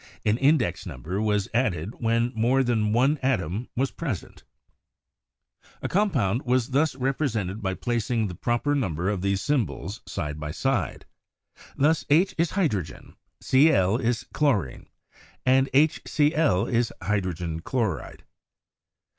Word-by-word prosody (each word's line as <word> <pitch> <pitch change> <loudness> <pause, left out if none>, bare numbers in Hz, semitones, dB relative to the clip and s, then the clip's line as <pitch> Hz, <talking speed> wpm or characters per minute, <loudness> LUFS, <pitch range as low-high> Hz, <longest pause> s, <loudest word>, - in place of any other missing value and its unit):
An 110 +2 +2
index 135 - +2
number 95 +6 -4
was 105 -2 +1
added 105 -5 0
when 115 +1 +1
more 125 +4 +2
than 110 -4 +1
one 135 +6 +2
atom 115 -4 -1
was 135 +2 0
present 135 - -5 1.4
A - - 0
compound 135 - +1
was 125 -1 +1
thus 145 +2 +1
represented 125 -7 -1
by 95 -2 -2
placing 120 0 -1
the 95 - -4
proper 120 +9 0
number 95 - -1
of 100 -3 -2
these 100 0 0
symbols 120 -6 -2
side 75 0 -4
by 75 0 -5
side. 120 - -1 0.7
Thus, 155 +3 +3
H 175 +6 +4
is 170 0 +2
hydro 160 - +1
gen, 75 -2 -12 0.3
CI 135 +4 +5
is 115 - +1
chlorine, 105 - 0 0.6
and 130 +1 +4
HC1 150 - +2
is 120 0 +1
hydrogen 90 -5 -2
chloride. 100 - -3
115 Hz, 130 wpm, -25 LUFS, 95-135 Hz, 1.4 s, CI